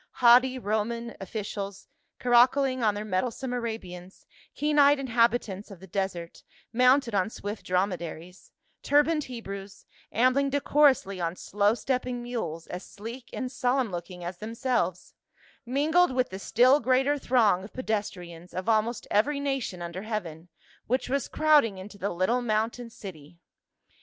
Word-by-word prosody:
Haughty 255 +2 +5
Roman 230 +1 -2
officials 200 0 -5 0.3
caracoling 255 +2 +4
on 210 -2 +2
their 210 +1 -4
mettlesome 235 +6 -2
Arabians, 190 -7 -6 0.3
keen 295 0 +1
eyed 285 0 +6
inhabitants 235 -5 0
of 195 -4 -11
the 190 - -11
desert, 185 -3 -4 0.3
mounted 250 0 +4
on 190 0 +1
swift 205 -1 -6
drom 185 +2 +2
edaries, 175 +1 -9 0.3
turbaned 295 +1 +2
Hebrews, 200 -5 -8 0.3
ambling 255 +4 +3
decorously 275 -8 +2
on 170 0 -1
slow 205 +3 +1
stepping 250 -1 -2
mules 175 -10 -4
as 180 +1 -7
sleek 235 +4 -9
and 255 -1 -4
solemn 255 -3 0
looking 175 0 -7
as 175 +1 -6
themselves, 225 -4 -2 0.5
mingled 305 +6 +3
with 255 -1 +1
the 190 - -6
still 255 +7 +4
greater 270 +2 +2
throng 220 -9 +3
of 200 - -10
pedestrians, 185 -8 -5
of 185 +2 -4
almost 225 +1 +1
every 280 +8 +2
nation 270 -11 -2
under 170 +2 -6
heaven, 180 -6 -5 0.4
which 255 +2 0
was 275 -1 0
crowding 295 -10 +3
into 200 +2 -10
the 200 - -1
little 185 +8 0
mountain 230 +1 -1
city. 170 -7 -11
225 Hz, 140 wpm, -27 LUFS, 190-255 Hz, 0.5 s, eyed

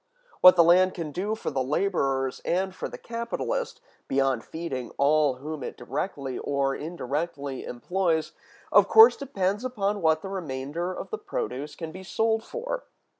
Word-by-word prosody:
What 180 0 +9
the 170 - +7
land 185 +2 +5
can 165 -4 -4
do 200 +8 -2
for 220 - -4
the 135 - -1
laborers 135 -4 0
and 190 +2 0
for - - -5
the - - -8
capitalist, 240 - -3 0.3
beyond 135 -3 +1
feeding 160 -7 -5
all 145 -1 +3
whom 150 +3 -6
it - - -6
directly 135 0 -4
or 140 -1 0
indirectly 145 -3 -4
employs, 165 +5 -1 0.4
of - - +6
course 445 +2 +8
depends 205 -6 -2
upon 210 -5 -1
what 160 -1 +2
the 195 - -5
remainder 165 -1 -4
of - - -7
the 435 - -3
produce 150 - -4
can 165 -2 -6
be 185 - -9
sold 220 +3 0
for. - - -5
170 Hz, 160 wpm, -26 LUFS, 140-195 Hz, 0.4 s, What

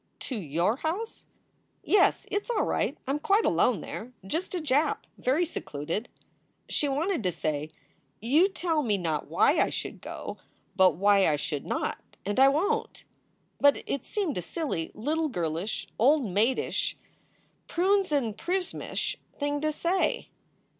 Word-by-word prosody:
"To 260 - -4
your 170 - 0
house?" 365 +10 -4 0.6
"Yes. 405 -2 +4
It 410 - +1
s - - -19
all 455 -4 +2
right. - - 0
I 270 - -1
m 290 - 0
quite 405 +8 +3
alone - - +3
there. 245 +3 -7
Just 330 - -2
a - - 0
Jap. 295 0 +2 0.2
Very 285 +8 +2
secluded." 165 - -4 0.6
She 290 - 0
wanted 320 +4 0
to 185 -3 0
say: 155 -2 -2 0.5
"You 295 - +4
tell 335 -5 0
me 215 -7 +1
not 160 -5 -2
why - - +3
I - - +3
should - - -5
go, - - -7 0.4
but 185 -4 +5
why 200 +2 +4
I 150 - +3
should 145 -1 -4
not. - - -1 0.3
And 205 +5 0
I 270 - +8
won 400 +11 +2
t." - - -14 0.6
But 285 0 +4
it 275 - -2
seemed 375 - -2
a - - -3
silly 180 - -3
little 310 +7 0
girlish, 170 - -2
old 275 +4 +5
maidish, 215 +6 0 0.7
prunes 380 +1 +2
and 245 -8 +1
prismish 360 +5 -2 0.2
thing 290 0 -1
to 310 0 +1
say. 345 +5 0
275 Hz, 155 wpm, -28 LUFS, -, 0.7 s, I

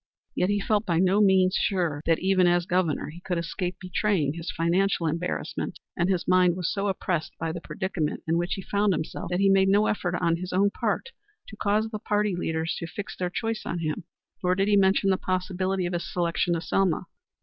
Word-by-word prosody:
Yet 180 - +1
he 205 0 +1
felt 210 +1 +1
by 170 -2 +2
no 190 +4 +3
means 190 -2 +4
sure 170 -7 0
that 165 -1 +4
even 185 -1 +3
as 175 0 +3
Governor 175 -5 0
he 170 - -11
could 180 -1 -2
escape 175 +2 -3
betraying 185 -5 0
his 170 +2 -6
financial 180 +1 +1
embarrassment, 165 +3 -3 0.2
and 175 0 +1
his 185 -3 0
mind 180 -1 +4
was 180 -3 -1
so 200 0 -1
oppressed 185 -4 -2
by 165 0 -2
the 170 +1 -6
predicament 180 -6 -3
in 165 - +2
which 175 +2 0
he 195 - -7
found 200 0 +1
himself 155 - -4
that 180 0 0
he 195 - +4
made 195 0 +4
no 205 +2 +4
effort 180 -5 -1
on 170 -2 +1
his 180 +1 -6
own 200 +2 +3
part 475 - -2 0.4
to 215 - -10
cause 215 +1 +1
the 215 - -4
party 210 -2 0
leaders 160 -1 -2
to 170 - -5
fix 205 +4 -6
their 180 -1 -2
choice 225 +4 -2
on 170 - -3
him. 160 0 -3 0.4
Nor 180 0 +2
did 195 +1 +1
he 205 - +5
mention 195 0 +4
the 190 - +2
possibility 185 0 -1
of 175 - -3
his 175 - -3
selection 175 0 0
to 165 - -2
Selma. 190 -1 +1
185 Hz, 215 wpm, -26 LUFS, 170-195 Hz, 0.4 s, he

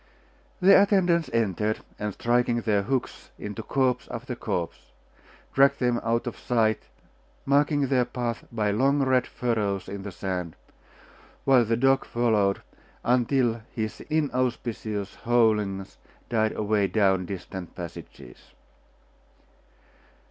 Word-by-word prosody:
The 195 +1 +7
attendants 180 -5 +2
entered, 110 -1 0 0.2
and 105 0 -2
striking 120 +1 +1
their 105 -3 +1
hooks 125 +5 -3
into 105 +2 -6
corpse 125 +1 0
after - - -5
corpse, 85 -2 -4 0.6
dragged 140 +1 +5
them 120 -2 +1
out 115 +1 0
of 120 - -5
sight, 110 -3 +1 0.6
marking 145 +1 +3
their 130 -2 +2
path 120 -2 -3
by 105 -3 0
long 135 +6 +2
red 130 -1 +2
furrows 105 -5 -1
in 100 0 -6
the 100 0 -6
sand; 90 -3 -4 0.9
while 130 -3 +6
the 115 +1 +1
dog 135 +2 +3
followed, 110 -5 +1 0.4
until 120 -1 +2
his 110 -2 -3
inauspicious 125 -8 -1
howlings 105 -5 +1 0.3
died 110 -2 +1
away 105 -1 +1
down 95 -3 +2
distant 95 -1 -7
passages. 85 -2 -10
115 Hz, 115 wpm, -26 LUFS, 105-130 Hz, 0.9 s, The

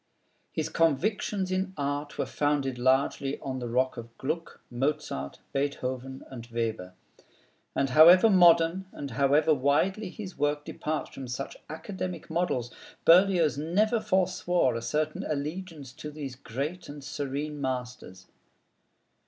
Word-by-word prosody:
His 155 -1 -2
convictions 185 +5 +1
in 190 0 -1
art 145 +1 -3
were - - 0
founded 140 -4 0
largely 135 +2 +1
on 130 -1 -4
the 120 -1 -4
rock 130 +2 +1
of 115 0 -9
Gluck, 165 +5 -4
Mozart, 130 - -2 0.2
Beethoven, 135 -2 -3
and 120 -3 -8
Weber; 110 -6 -3 0.8
and 135 -1 +1
however 170 - +8
modern, 175 -1 +5
and 140 -2 -6
however 140 +6 +3
widely 150 +9 +1
his 190 -2 -8
work 145 0 0
departs 155 0 -3
from 135 -1 -8
such 125 +3 -5
academic 175 +1 -6
models, 160 -8 -1 0.3
Berlioz 170 -5 +5
never 210 +9 +2
forswore 180 - +1
a 115 - -3
certain 150 +7 -1
allegiance 155 -1 -5
to 150 +1 -7
these 145 -3 -6
great 140 +9 -5
and 145 -1 -9
serene 145 +2 -4
masters. 125 -8 -4
145 Hz, 130 wpm, -28 LUFS, 130-170 Hz, 0.8 s, however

